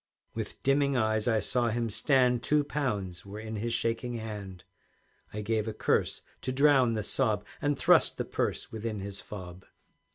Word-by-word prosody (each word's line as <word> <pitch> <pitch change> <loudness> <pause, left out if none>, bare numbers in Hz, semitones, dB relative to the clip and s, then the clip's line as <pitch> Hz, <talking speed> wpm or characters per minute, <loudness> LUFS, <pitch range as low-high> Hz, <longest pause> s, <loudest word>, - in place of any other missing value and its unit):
With - - -6
dimming 140 0 +3
eyes 110 -1 +1
I 110 -2 +3
saw 120 +3 +1
him 115 0 -1
stand, 125 0 +3
Two 150 +3 +2
pounds 105 -12 -2
were 100 +2 -8
in 110 0 -5
his 115 +3 -2
shaking 115 +1 -1
hand; 105 -5 -6 0.7
I 105 - -4
gave 110 +1 -1
a 110 - -2
curse - - 0 0.2
to 130 - -2
drown 135 -3 +4
the 110 -1 -1
sob, 105 0 +1 0.2
And 145 -1 +1
thrust - - +4
the - - -2
purse - - -2
within 110 -2 -4
his 100 0 -6
fob. 90 -3 -9
110 Hz, 170 wpm, -29 LUFS, 105-125 Hz, 0.7 s, drown